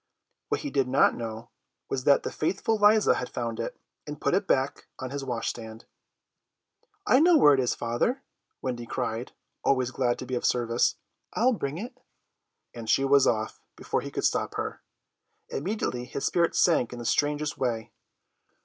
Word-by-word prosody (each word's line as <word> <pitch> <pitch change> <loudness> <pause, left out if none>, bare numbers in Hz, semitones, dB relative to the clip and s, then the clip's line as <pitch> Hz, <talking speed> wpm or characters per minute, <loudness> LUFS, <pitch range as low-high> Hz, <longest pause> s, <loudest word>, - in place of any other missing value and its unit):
What 435 0 0
he 290 - -4
did 135 -2 +1
not 135 +2 +4
know 115 +1 -6 0.4
was 130 -1 -3
that 140 - +5
the - - -3
faithful 200 +8 0
Liza 210 +1 +5
had 125 - -3
found 115 -2 -4
it, 115 - -4 0.3
and 150 -1 -6
put - - 0
it 195 +1 +1
back 135 +1 0
on 130 -1 -6
his 140 0 -4
wash 120 -4 -2
stand. 110 -1 -8 1.2
"I 270 - +5
know 335 +2 +6
where 145 - +7
it 135 - +2
is, 125 -2 +1
father," 120 - -1 0.4
Wendy 120 -2 -3
cried, 115 +2 -3 0.3
always 130 -2 +2
glad 125 -2 0
to - - -6
be 130 - -6
of 125 - -1
service. 120 -1 +2 0.4
"I'll 250 +3 +3
bring 145 -8 -3
it," 245 +6 -7 0.7
and 115 -2 -7
she 135 - +3
was 140 0 +5
off 110 -1 -1
before - - -2
he - - -6
could - - -2
stop - - 0
her. - - -4 0.7
Immediately 145 - -2
his 135 - -4
spirits 170 -1 +1
sank 160 -9 +3
in - - -7
the 120 - -7
strangest 145 +4 0
way. 115 -4 -2
130 Hz, 175 wpm, -27 LUFS, 120-170 Hz, 1.2 s, where